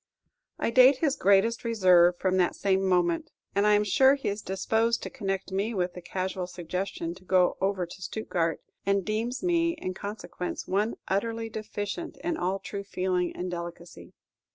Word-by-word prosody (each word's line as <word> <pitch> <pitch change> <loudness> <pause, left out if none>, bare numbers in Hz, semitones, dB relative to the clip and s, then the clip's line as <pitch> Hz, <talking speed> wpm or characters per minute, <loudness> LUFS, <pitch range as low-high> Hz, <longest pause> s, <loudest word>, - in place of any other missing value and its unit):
I - - -1
date 255 +2 +7
his 285 -1 +1
greatest 200 +4 +3
reserve 180 -6 +5
from 185 0 +1
that 180 -2 +2
same 190 -1 +1
moment; 175 -2 +1 0.2
and 200 +1 +2
I 210 - +5
am 205 - +3
sure 265 +7 +5
he 275 - -3
is 205 +1 -3
disposed 225 +5 0
to - - -5
connect 195 -2 -3
me 205 +4 -1
with 180 -2 -1
the 180 - -8
casual 185 0 -3
suggestion 180 -1 -4
to 185 +1 -16
go 185 -1 +3
over 190 -2 0
to 175 +2 -12
Stuttgard, 175 -5 -1 0.3
and 200 -1 +1
deems 230 +7 -2
me, 335 -1 +2
in 185 - -5
consequence, 180 -3 -6
one 205 +4 0
utterly 225 +3 -1
deficient 215 +8 -5
in 335 -1 0
all 185 - -1
true 200 +1 -6
feeling 180 -2 -1
and 180 0 -4
delicacy. 170 0 -8
195 Hz, 175 wpm, -28 LUFS, 180-220 Hz, 0.3 s, date